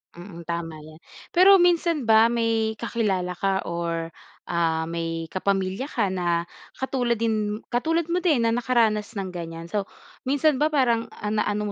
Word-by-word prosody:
Mm. 170 -2 -10
Tama 165 -1 -4
yan. 155 +1 -14 0.3
Pero 385 +2 +7
minsan 340 -5 +2
ba 225 +1 +6
may 225 -2 0
kakilala 195 -6 -1
ka 195 +1 -1
or, 170 -1 -3 0.3
ah, 165 -2 0
may 165 0 -3
kapamilya 195 +6 -1
ka 200 -5 0
na 170 -2 0 0.3
katulad 250 -3 0
din 215 -2 0 0.2
katulad 325 +6 +1
mo 360 +1 +1
din 290 -10 +2
na 230 - +2
nakaranas 225 -3 +1
ng 190 -1 -3
gan'yan? 165 -1 -6
So, 205 -2 -1 0.3
minsan 285 +1 +2
ba 305 - +4
parang, 245 -6 +1
ah, 210 +1 -3
naano 210 0 0
210 Hz, 155 wpm, -24 LUFS, 170-245 Hz, 0.3 s, Pero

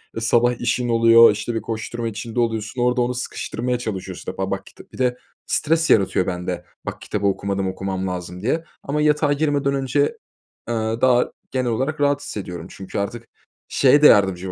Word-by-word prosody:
Iıı, 115 - -3
sabah 120 +1 +2
işin 120 0 0
oluyor, 115 -1 +7
işte 110 +3 -3
bir 110 - -1
koşturma 115 +1 -4
içinde 115 +2 -4
oluyorsun. 115 +1 -1
Orada 125 0 +2
onu 120 +1 0
sıkıştırmaya 125 0 -3
çalışıyorsun 95 -6 -5
işte - - -7
ba - - -2
bak - - -3
kita. - - -14
Bir - - -11
de 125 -1 +1 0.3
stres 160 +1 +1
yaratıyor 95 -2 +3
bende 90 -1 -3 0.2
bak - - -6
kitabı 105 -1 -3
okumadım 100 0 -1
okumam 95 0 -3
lazım 90 0 -5
diye. 145 +10 0 0.2
Ama 150 +2 -1
yatağa 150 -1 +3
girmeden 145 -2 0
önce, 135 +1 -1 0.7
eee, 120 - 0 0.3
daha 125 -1 +3 0.2
genel 130 -2 0
olarak 135 +7 -2
rahat 145 0 +2
hissediyorum. 90 - -6
Çünkü 95 +1 -6
artık 115 +4 -4 0.4
şeye 140 +2 +4
de 150 - +9
yardımcı 95 -2 +3
115 Hz, 180 wpm, -22 LUFS, 100-130 Hz, 0.7 s, de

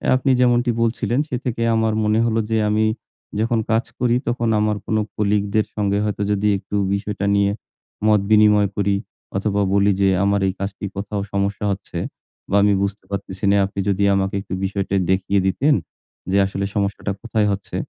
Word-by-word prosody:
আপনি 130 +1 +1
যেমনটি 120 0 +3
বলছিলেন। 115 +2 0
সে 125 - -2
থেকে 115 -2 -2
আমার 110 -1 +1
মনে 105 +1 +2
হল 115 -1 0 0.2
যে 110 - +2
আমি 110 +1 +2 0.5
যখন 115 +1 +1
কাজ 115 +1 +2
করি 120 -1 +2
তখন 120 -1 0
আমার 105 0 +1
কোনো 110 0 +1 0.2
কলিগদের 105 0 +1
সঙ্গে 100 -1 0
হয়তো 105 -1 -2
যদি 105 +1 +1
একটু 95 +1 -7 0.2
বিষয়টা 100 0 -2
নিয়ে 100 0 +3 0.6
মত 105 -1 +5
বিনিময় 105 -2 +5
করি 100 0 +1 0.4
অথবা 100 0 0
বলি 100 0 +4
যে, 95 - +4 0.2
"আমার 100 0 +2
এই 95 - -1
কাজটি 100 0 -4
কোথাও 100 +1 -3
সমস্যা 100 +1 -1
হচ্ছে 95 -3 -6 0.5
বা 100 - +1
আমি 105 0 +4
বুঝতে 100 +1 -3
পারতেছি 100 0 -5
না। 100 - +4
আপনি 100 +1 -6
যদি 100 0 +1
আমাকে 95 +1 -1
একটু 95 - -8
বিষয়টা 100 0 -1 0.2
দেখিয়ে 95 +1 +1
দিতেন, 140 +11 +2 0.6
যে 100 - +3
আসলে 95 0 -3
সমস্যাটা 100 0 -1
কোথায় 110 -3 0
হচ্ছে?" 100 0 -5
105 Hz, 175 wpm, -21 LUFS, 100-110 Hz, 0.6 s, মত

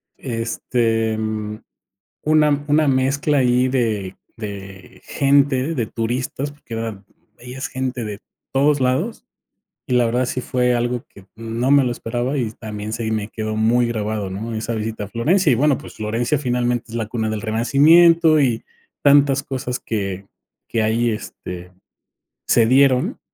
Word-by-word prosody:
Este, 115 -2 -1
mm, 110 -1 -3 0.6
una 150 -2 +3
una 150 0 +3
mezcla 140 +3 +1
ahí 125 0 +3
de 110 -7 -1 0.2
de 100 -3 -9
gente, 140 +1 +2
de 120 -5 0
turistas, 125 +5 -3
porque 145 -5 -13
era 115 -3 -4 0.3
veías 125 +2 -6
gente 130 -2 -3
de 105 -1 -6 0.3
todos 140 +2 +3
lados. 130 0 -1 0.6
Y - - -1
la 120 -1 +4
verdad 120 +2 +1
sí 125 - -3
fue 125 0 +1
algo 120 0 -1
que 100 -1 -17
no 115 +3 -2
me 140 -1 +6
lo 125 - 0
esperaba 120 +4 -2
y 120 -4 -1
también 105 -1 -6
se 115 -1 -2
me 110 -2 -1
quedó 110 -1 -4
muy 115 +3 +3
grabado 105 -3 -2
¿no? 110 +4 -5
Esa 110 +1 -3
visita 110 -1 -3
a - - -6
Florencia, 155 - +2
y - - +4
bueno, 145 +3 +3
pues, - - -12
Florencia 115 +5 -1
finalmente 125 -2 0
es 115 - -7
la 115 -1 -1
cuna 110 -1 -2
del 110 -1 -3
renacimiento, 155 +8 +5
y 120 -5 +1 0.4
tantas 140 -1 +5
cosas 125 -2 -4
que 100 -3 -4 0.4
que 115 - 0
ahí 115 +2 +1
este 90 -4 -7 0.8
se 115 - +4
dieron 130 +1 +3
120 Hz, 155 wpm, -20 LUFS, 110-135 Hz, 0.8 s, me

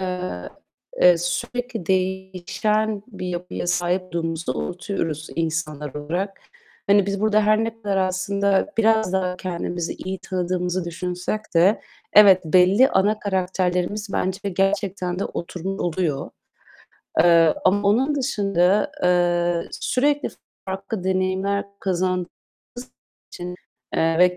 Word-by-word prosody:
eee, 180 - -4 0.7
sürekli 225 +5 -3
değişen 190 +3 -1
bir 190 -6 -7
yapıya 175 0 -4
sahip 175 +1 +1
olduğumuzu 165 -2 -3
unutuyoruz 165 -4 -3
insanlar 155 -3 -2
olarak. 175 +7 -3 0.5
Hani, 200 -1 +4
biz 200 -1 -2
burada 215 0 +3
her 215 +1 +3
ne 225 0 -6
kadar 200 -2 -1
aslında 195 +1 +1
biraz 220 -3 +3
daha 185 -1 0
kendimizi 175 -1 -3
iyi 190 0 -5
tanıdığımızı 180 -1 -2
düşünsek 180 +4 -3
de 180 +6 +4 0.3
evet, 195 -3 +8
belli 185 +9 +5
ana 210 +3 +2
karakterlerimiz 190 +1 -1
bence 190 +2 -1
gerçekten 195 -1 -1
de - - -1
oturmuş 185 +3 -5
oluyor. 165 -5 -1 0.9
Eee, 165 -1 +5
ama 200 +2 +3
onun 265 +8 +2
dışında, 200 -7 +1
eee, 175 -1 +2
sürekli 290 +3 0 0.4
farklı 195 +1 -4
deneyimler 190 +2 0 0.2
kazandığımız 185 -1 0 0.5
için, 250 +1 -9 1.0
eee, 165 0 +2
ve 180 0 +5
185 Hz, 110 wpm, -23 LUFS, 175-200 Hz, 1.0 s, evet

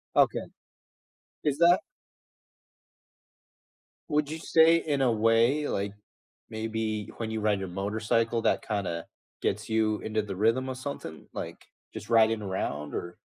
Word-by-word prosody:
Okay, - - +3 1.0
is 145 -2 +1
that 170 +2 +6 2.3
Would 150 -1 +1
you 160 - -4
say 165 +1 +5
in 145 -4 -1
a 125 - +4
way 115 +6 +3
like, 100 +1 -2 0.6
maybe 110 -1 -3
when 110 -1 -3
you 110 - -2
ride 105 -2 +2
your 95 - -4
motorcycle, 110 +4 0
that - - +1
kinda 95 -6 -2 0.4
gets 105 +3 -1
you 110 -1 +1
into 110 0 -1
the 100 -2 -5
rhythm, 115 +6 +2
or 130 - -3
something, 130 - -7
like, - - -6 0.3
just 110 0 -8
riding 110 -1 +4
around 75 -7 -3
or 85 0 -5
110 Hz, 135 wpm, -28 LUFS, 105-130 Hz, 2.3 s, that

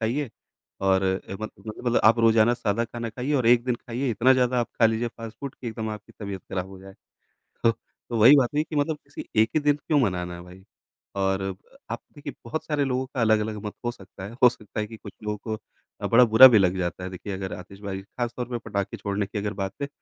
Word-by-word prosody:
खाइए 120 +3 -1 0.5
और 95 0 +3
ए 95 0 -2
मत 110 - -4 0.2
मतलब 120 +2 0
आप 115 +2 +6
रोज़ाना 115 +1 +5
सादा 115 -1 0
खाना 115 +1 -5
खाइए 130 +5 -3
और 125 -4 +2
एक 120 0 +5
दिन 125 -2 +1
खाइए 125 +2 -3
इतना 120 +4 +4
ज़्यादा 125 -1 +2
आप 120 - -2
खा 115 - +8
लीजिए 115 +1 0
फ़ास्ट 115 -1 -10
फ़ूड 140 -2 -5
कि 120 - -6
एकदम 110 0 -4
आपकी 105 -1 -9
तबीयत 100 -3 -5
खराब 95 -1 -2
हो 95 -1 -11
जाए। 95 0 -12 0.7
ह 115 - +7 0.4
तो 115 - -1
वही 120 +7 +8
बात 125 -3 +3
नहीं 150 - +2
कि 155 - -5
मतलब 150 +1 +1
किसी 140 +1 -9 0.2
एक 110 - +3
ही - - +5
दिन 145 0 +3
क्यों 150 0 0
मनाना 90 -6 0
है 85 - -9
भाई? 90 +1 -14 0.5
और 95 0 +1 0.5
आप - - -3 0.2
देखिए 145 -1 -7
बहुत 140 +7 -3
सारे 150 -2 0
लोगों 130 0 -1
का 130 -2 -4
अलग-अलग 110 -1 +2
मत 105 - -4
हो 120 - +1
सकता 95 -2 -13
है, 100 - -7
हो 125 - +10
सकता 105 -2 -8
है 105 - 0
कि 115 0 -10
कुछ 100 - -11
लोग 105 -1 -3
को 110 0 -2 0.5
बड़ा 125 +2 +7
बुरा 115 +3 +10
भी 115 -4 +5
लग 95 -1 +3
जाता 90 0 -3
है 90 - -4
देखिए 95 +2 -6
अगर 95 0 -4
आतिशबाजी 95 +1 -7
खास 120 +3 -4
तौर 125 - -2
पे 120 - -2
पटाखे 100 -1 -2
छोड़ने 100 0 -2
की 100 - -6
अगर 105 +1 -2
बात 95 -1 -3
है 140 - -1
110 Hz, 240 wpm, -25 LUFS, 100-125 Hz, 0.7 s, हो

